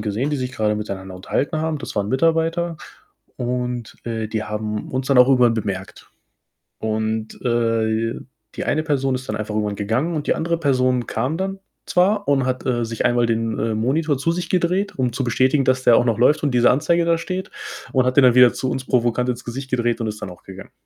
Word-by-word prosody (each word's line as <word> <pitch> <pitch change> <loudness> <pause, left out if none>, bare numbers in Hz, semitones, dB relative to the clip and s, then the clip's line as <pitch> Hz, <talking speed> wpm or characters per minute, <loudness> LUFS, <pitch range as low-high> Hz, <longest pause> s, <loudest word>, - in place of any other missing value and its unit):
gesehen, 110 +7 -1
die 150 - 0
sich 130 -1 -4
grade 105 -3 0
miteinander 95 -3 -5
unterhalten 140 - -2
haben. 155 -1 -1
Das - - -7
waren 100 0 -1
Mitarbeiter 165 +5 +1 0.6
und, 125 -2 -3
äh, 115 -2 -3
die 110 -1 -2
haben 105 0 -4
uns 130 0 -2
dann 135 -2 +4
auch 125 - +8
irgendwann 125 -3 +4
bemerkt 95 -4 -5 0.7
und, 110 0 -2
äh, 115 -1 0 0.4
die - - -3
eine 155 - 0
Person 135 -4 0
ist 130 -1 -5
dann 105 - -2
einfach 105 0 -4
irgendwann 105 -1 -1
gegangen 120 +12 -1
und 150 -2 -3
die - - +2
andere 170 +1 -1
Person 130 -5 +1
kam 130 +8 -2
dann 195 +1 -3 0.3
zwar 200 +3 +2
und 135 -2 +2
hat, 130 0 -2
äh, 120 -2 +1
sich 115 0 -3
einmal 120 -1 +2
den, 115 -1 -1
äh, 110 -1 -1
Monitor 145 +7 +1
zu 165 +4 0
sich 175 0 -3
gedreht, 185 +2 0
um 125 -2 +1
zu 130 - -2
bestätigen, 130 +3 +2
dass 130 0 +1
der 120 - +7
auch - - +3
noch 115 - +2
läuft 150 +5 +4
und 145 - +1
diese 120 0 +5
Anzeige 165 +5 +2
da 165 0 +2
steht 185 +2 -4 0.4
und 130 -1 +2
hat 130 - 0
den 140 - +7
dann 125 -1 +6
wieder 125 -1 +7
zu 130 - -2
uns 130 0 -3
provokant 125 -1 +1
ins 125 -1 -3
Gesicht 130 +3 -6
gedreht 120 -2 0
und 115 - -1
ist 105 0 -5
dann - - -5
auch 90 - -13
gegangen. 95 0 -11
125 Hz, 220 wpm, -21 LUFS, 110-145 Hz, 0.7 s, auch